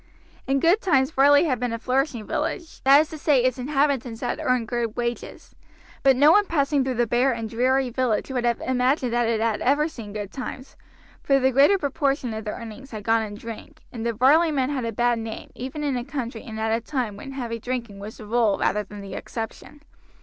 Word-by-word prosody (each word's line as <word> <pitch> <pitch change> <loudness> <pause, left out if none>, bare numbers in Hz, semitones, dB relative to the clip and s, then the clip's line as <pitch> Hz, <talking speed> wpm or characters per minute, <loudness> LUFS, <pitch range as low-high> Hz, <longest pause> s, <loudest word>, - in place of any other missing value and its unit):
In 270 +1 +2
good 345 +9 +3
times 270 -6 +2
Varley 285 +1 +5
had 260 -8 0
been 245 -1 -1
a 230 - -2
flourishing 255 -1 -1
village, 335 - -4
that 275 +2 +8
is 310 - -3
to 315 - -7
say 285 -5 +3
its 255 0 +1
inhabitants 270 -4 0
had - - -2
earned 250 -3 0
good 235 -2 -2
wages; 240 0 -4 0.5
but 270 -1 +5
no 290 +4 +6
one 410 +2 +4
passing 285 -3 +1
through 260 -1 -2
the 240 +1 +2
bare 245 +4 +2
and 230 -1 -4
dreary 255 +3 +1
village 250 -1 -1
would 250 -2 -1
have 235 -1 +1
imagined 255 0 +1
that 240 -1 +2
it 225 -1 +1
had 225 -1 0
ever 290 +4 +2
seen 230 -10 -9
good 205 -1 -6
days, 260 0 -7 0.5
for 275 -1 +3
the 265 0 +2
greater 280 +10 +5
proportion 275 -5 -1
of 220 0 -6
the 210 - -2
earnings 230 +5 -9
had 215 -4 -7
gone 225 +1 +2
in 210 -2 -5
drink, 225 +1 -10
and 230 -2 -6
the 235 - 0
Varley 280 +9 +4
men 270 -2 0
had 260 -4 -2
a 230 - -2
bad 240 +1 +1
name 225 -1 -7
even 265 +4 -6
in 280 -3 0
a 245 - -2
country 245 -4 -5
and 220 -1 -7
at 220 0 +1
a 230 - -3
time 240 -4 -3
when 270 +7 -9
heavy 235 -3 -4
drinking 235 -4 -5
was 210 +2 -8
the 215 - -10
rule 225 -2 +2
rather 210 - +1
than 205 +1 -10
the 195 -1 -8
exception. 230 +8 -7
250 Hz, 225 wpm, -24 LUFS, 225-275 Hz, 0.5 s, that